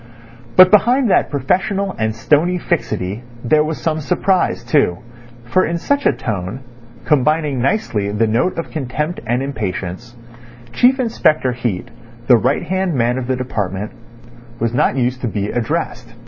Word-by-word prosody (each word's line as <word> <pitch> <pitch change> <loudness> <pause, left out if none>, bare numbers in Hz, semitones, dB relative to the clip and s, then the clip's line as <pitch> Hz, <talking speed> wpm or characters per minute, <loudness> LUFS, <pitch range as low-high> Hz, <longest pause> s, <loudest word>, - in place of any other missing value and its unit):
But 185 0 +8
behind 240 +2 +4
that - - +3
professional 190 +8 0
and 110 0 -1
stony 155 +9 +2
fixity 110 - -2 0.2
there 150 +5 +3
was 155 0 -3
some 160 -1 -1
surprise 180 +4 0
too, 135 - +2 0.5
for 185 +11 +2
in 170 +1 -1
such 285 +11 0
a - - +5
tone, 105 +3 -4 0.4
combining 150 -2 +1
nicely 120 - 0
the 105 +2 +1
note 115 +12 0
of 165 - -4
contempt 150 +3 -3
and 125 +3 0
impatience, 110 -2 -5 0.6
Chief 260 +2 +4
Inspector 155 - +2
Heat, 120 -6 -3 0.3
the 125 -1 +6
right 130 +5 0
hand 185 -2 -1
man 120 +1 +1
of 125 - -5
the 130 - +1
department, 105 -5 -3 0.7
was 115 0 -1
not 125 - +1
used 125 0 0
to 125 - -1
be 105 -2 -2
addressed. 120 -2 -3
130 Hz, 150 wpm, -18 LUFS, 115-170 Hz, 0.7 s, But